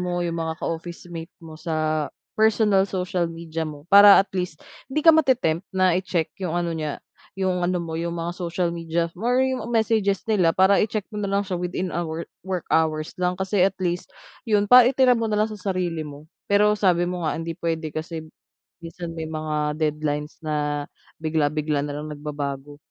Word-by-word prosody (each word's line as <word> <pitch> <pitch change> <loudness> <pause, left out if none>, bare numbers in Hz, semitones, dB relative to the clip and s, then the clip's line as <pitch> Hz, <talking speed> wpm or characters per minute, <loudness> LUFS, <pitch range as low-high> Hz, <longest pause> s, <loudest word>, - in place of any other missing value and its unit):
mo, 175 -1 -1
'yung 170 -1 -2
mga 160 0 -2
ka-officemate 170 0 -6
mo 160 - -10
sa 155 -2 -1 0.2
personal 210 -3 +3
social 180 -2 -1
media 165 -1 -5
mo, 145 -1 -10
para 200 0 +10
at - - -38
least 180 -5 -4 0.2
hindi 295 +3 -2
ka 325 - +9
mate-tempt 245 - +2
na 185 -1 +4
i-check 175 -3 -2
'yung 175 -3 -2
ano 170 -1 -1
niya 155 -3 -3 0.4
'yung 185 -2 0
ano 180 +1 +1
mo, 165 -2 -5
'yung 170 +1 -2
mga 165 +1 -2
social 175 -1 -2
media, 165 0 -1
or 240 +7 0
'yung 260 -1 -1
messages 220 -4 +1
nila 195 -7 +3
para 190 +1 +5
i-check 210 -2 -2
mo - - -3
na 200 - -2
lang 200 0 +2
siya 185 - -3
within, 180 +1 -3
ah, 175 - 0
wo 160 +1 -4 0.2
work 185 -3 -3
hours 155 -1 +1
lang, 180 0 0
kasi 190 0 +1
at 190 0 +3
least 175 -1 -2 0.4
'yun 205 -2 +2
para 250 +2 +8
itira 260 -2 +4
mo 230 -1 -1
na 210 - +1
lang 220 - -1
sa 215 - -7
sarili 175 -3 -1
mo. 150 0 -10 0.2
Pero 210 +1 +5
sabi 180 -4 +2
mo 180 0 -3
nga, 160 - -1
hindi 165 0 -4
puwede 165 -2 -3
kasi 160 0 -5 0.6
minsan 170 0 -7
may 160 - -3
mga 155 -1 -2
deadlines 150 -1 -1
na 150 -1 -1 0.3
bigla-bigla 155 -2 0
na 145 0 -5
lang 155 0 -6
nagbabago. 145 -1 -5
170 Hz, 190 wpm, -24 LUFS, 155-195 Hz, 0.6 s, para